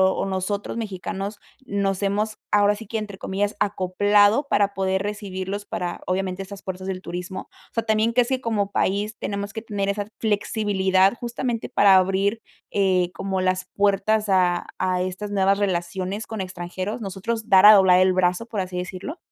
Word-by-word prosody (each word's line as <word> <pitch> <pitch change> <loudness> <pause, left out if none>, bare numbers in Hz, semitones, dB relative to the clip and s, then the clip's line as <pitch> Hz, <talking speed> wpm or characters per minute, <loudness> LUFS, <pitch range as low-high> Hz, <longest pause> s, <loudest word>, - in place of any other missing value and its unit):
o - - -1
nosotros 195 +1 -3
mexicanos 200 -1 -5 0.3
nos 200 -3 -1
hemos, 210 +2 0
ahora 205 0 +4
sí 225 +2 -10
que 225 - -3
entre 210 -3 -6
comillas, 200 +2 -2
"acoplado" 205 +6 +3
para 200 -1 +2
poder 190 0 0
recibirlos 200 -1 -4
para, 175 -3 -4
obviamente, 185 0 -2
esas 200 0 -10
fuerzas 185 0 -6
del 185 -1 -4
turismo. 180 +1 -6 0.2
O - - -50
sea, 230 - -1
también, 220 +1 +2
¿crees 245 0 +3
que 260 0 -1
como 210 -4 -1
país 205 +3 0
tenemos 200 0 -4
que 220 - -5
tener 205 -3 -3
esa 205 0 -2
flexibilidad, 200 -3 +2
justamente 240 -1 -3
para 200 -1 +5
abrir, 195 +4 +2 0.3
eh, 185 -3 +2
como 195 -1 -2
las 185 0 0
puertas 205 +2 +2
a 180 -2 +2
a 185 -1 0
estas 185 +3 -4
nuevas 195 0 +3
relaciones 190 +2 -2
con 220 -3 -4
extranjeros, 185 +4 -5
nosotros 215 +3 -4
dar 190 -1 +7
a 210 - +11
doblar 190 -3 +6
el 185 0 +4
brazo, 180 +3 +1
por 225 -3 -4
así 185 -1 -3
decirlo? 185 - -5
200 Hz, 170 wpm, -23 LUFS, 185-210 Hz, 0.3 s, a